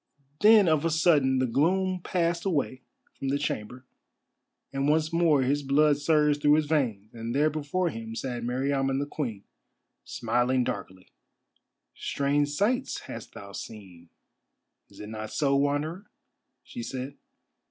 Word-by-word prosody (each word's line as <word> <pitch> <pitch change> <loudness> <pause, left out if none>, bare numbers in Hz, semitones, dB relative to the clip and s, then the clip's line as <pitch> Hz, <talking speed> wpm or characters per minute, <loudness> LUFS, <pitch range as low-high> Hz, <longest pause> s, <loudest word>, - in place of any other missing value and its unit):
Then 215 -2 +7
of 155 -2 +3
a 165 - +2
sudden 150 -5 +3
the 130 - +2
gloom 185 +8 +1
passed 170 -1 0
away 140 -8 -1 0.3
from 135 - -6
the 140 - +1
chamber, 125 -3 -4 0.9
and 135 +1 0
once 155 +1 +1
more 165 -5 +3
his 140 +3 +1
blood 145 +1 +3
surged 150 -1 +2
through 145 0 +5
his 155 0 +2
veins, 120 -9 -1
and 115 +1 -5
there 150 +2 +3
before 155 +4 -1
him 115 0 -7
sat 120 -1 -4
Meriamun 135 +2 0
the 140 - -1
Queen, 120 -9 -4 0.6
smiling 125 +1 0
darkly. 95 -4 -6 0.8
"Strange 145 +1 0
sights 205 - 0
hast - - -9
thou 100 0 -9
seen, 95 -5 -10 0.8
is - - -17
it 105 - -8
not 110 0 -6
so, 140 -2 +1
Wanderer?" 145 +7 -1 0.6
she 245 - -8
said. 135 - -5
140 Hz, 140 wpm, -27 LUFS, 125-155 Hz, 0.9 s, Then